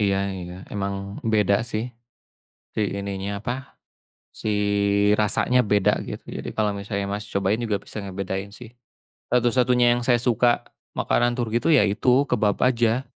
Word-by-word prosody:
Iya 100 -2 +2 0.2
iya. 90 -1 -7 0.2
Emang 100 0 -4
beda 105 -3 +2
sih, 110 -1 0 0.9
si 110 - -1 0.2
ininya 100 0 -4
apa, 130 +3 -5 0.6
si - - -5 0.7
rasanya 125 +4 +2
beda 105 -2 +2
gitu. - - -7
Jadi - - -6
kalau 105 -2 +1
misalnya, 100 0 -3
Mas, 105 +1 -4
cobain 100 +3 0
juga 110 -3 0
bisa 110 - -7
ngebedain 95 0 -4
sih. 120 +1 -12 0.6
Satu-satunya 125 0 +3
yang 120 - -2
saya 120 -2 +4
suka 120 -1 +2 0.3
makanan 120 0 +1
Turki 120 -1 0
itu - - +2
ya 130 - +6
itu 125 +7 +2
kebab 105 -2 +1
aja 120 0 +2
110 Hz, 145 wpm, -24 LUFS, 100-120 Hz, 0.9 s, ya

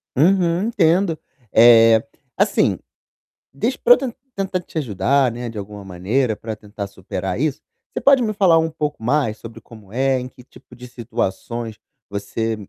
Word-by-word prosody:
Uhum, 175 +3 +3
entendo. 175 -4 +2 0.3
Eh, 115 -1 +7 0.3
assim, - - +2 0.8
diz 230 - -1
pra 245 - +6
eu - - +3
ten 255 -3 -4 0.2
tentar 190 -3 -2
te 170 - -10
ajudar, 130 +1 +1
né, 120 +1 -6
de 110 - -9
alguma 100 0 -7
maneira, 105 +7 -1
pra 110 +1 -6
tentar 105 -1 -7
superar 95 0 -5
isso, 145 -1 -1 0.3
você - - -3
pode 275 -2 +5
me 220 -3 0
falar 190 -5 +4
um 160 0 0
pouco 150 -3 -4
mais 125 -3 0
sobre 115 -1 -10
como 110 -3 -16
é, 130 +2 +1
em 125 - -6
que 125 - -17
tipo 125 - -18
de 125 +1 -11
situações 115 -1 -4 0.3
você 105 +3 -3
125 Hz, 165 wpm, -20 LUFS, 110-160 Hz, 0.8 s, Eh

